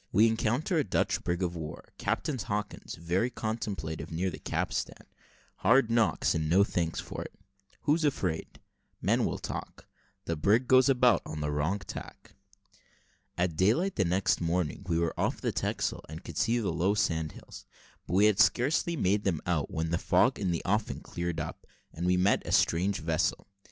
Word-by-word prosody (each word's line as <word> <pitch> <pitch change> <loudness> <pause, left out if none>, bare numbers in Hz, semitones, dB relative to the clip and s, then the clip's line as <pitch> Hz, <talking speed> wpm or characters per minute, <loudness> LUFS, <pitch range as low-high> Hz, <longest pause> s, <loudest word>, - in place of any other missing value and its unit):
WE 110 - +5
ENCOUNTER 120 - +1
A - - +2
DUTCH 100 - 0
BRIG 90 +1 -1
OF 90 -1 -2
WAR 80 -2 -7
CAPTAIN 135 -5 -1
HAWKINS 105 -1 -4
VERY 90 +8 0
CONTEMPLATIVE 105 -10 -4
NEAR 90 +3 -1
THE - - -8
CAPSTAN - - -3 0.5
HARD 130 -4 +4
KNOCKS, 115 -2 +2
AND 80 -1 -1
NO 95 +4 +5
THANKS 85 -5 -1
FOR - - -6
IT - - -9 0.5
WHO'S 155 +3 +2
AFRAID? 90 - -2 0.4
MEN - - +2
WILL - - -1
TALK - - -7 0.4
THE 85 - -1
BRIG 105 +10 +2
GOES 130 0 +6
ABOUT 125 -4 +4
ON 75 - -5
THE 75 0 -1
WRONG 75 +7 0
TACK. - - -9 1.0
At 90 -2 0
daylight 115 - +2
the 100 - +2
next 90 +2 +1
morning 85 +1 -1
we 85 - +2
were 85 0 0
off - - 0
the - - -1
Texel, - - -2
and 80 +3 -8
could - - -6
see 115 +3 +2
the 105 -8 -1
low 90 +5 +1
sand 80 -5 0
hills: - - -12 0.4
but 90 - -1
we 100 +2 +6
had 105 -2 +3
scarcely 155 +7 +3
made 105 - +1
them 90 -6 0
out, 85 -5 0
when 80 0 -2
the 85 - +1
fog - - +3
in 95 -3 -1
the 85 -2 -1
offing 105 +3 0
cleared 85 -1 -4
up, 75 +1 -6 0.3
and 85 +2 -3
we 90 0 +3
made 95 +2 +3
a - - -3
strange 95 +4 +2
vessel. 80 +2 0
95 Hz, 180 wpm, -29 LUFS, 85-110 Hz, 1.0 s, GOES